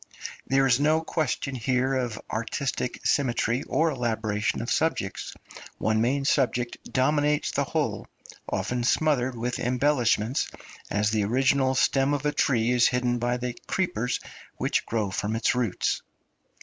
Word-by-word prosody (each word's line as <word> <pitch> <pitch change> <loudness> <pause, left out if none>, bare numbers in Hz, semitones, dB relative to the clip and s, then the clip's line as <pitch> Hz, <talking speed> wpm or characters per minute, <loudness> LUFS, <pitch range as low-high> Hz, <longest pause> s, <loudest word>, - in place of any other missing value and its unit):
There 135 0 +3
is 130 -1 +4
no 155 +2 +3
question 150 -4 -2
here 130 +2 0
of 125 -5 -2
artistic 125 +3 -3
symmetry 125 -2 +1
or 160 +1 +1
elaboration 110 -5 -1
of 120 - -4
subjects; 160 -12 -1 0.4
one 110 0 +1
main 135 +4 +1
subject 125 -4 0
dominates 150 +2 +2
the - - 0
whole, - - -2 0.4
often 125 -1 -1
smothered 130 -2 +1
with 120 +2 -2
embellishments, 125 -2 +1 0.4
as 105 +1 +1
the 110 -2 +1
original 130 +3 +2
stem 135 +2 +2
of 145 +1 -4
a 150 - +2
tree 120 -5 +1
is 125 -1 +5
hidden 125 -1 0
by 120 +1 0
the 125 -1 -4
creepers 125 - -1 0.4
which - - 0
grow 110 -4 -1
from 105 +4 -2
its 115 - +2
roots. 120 -6 0
125 Hz, 140 wpm, -26 LUFS, 115-135 Hz, 0.4 s, is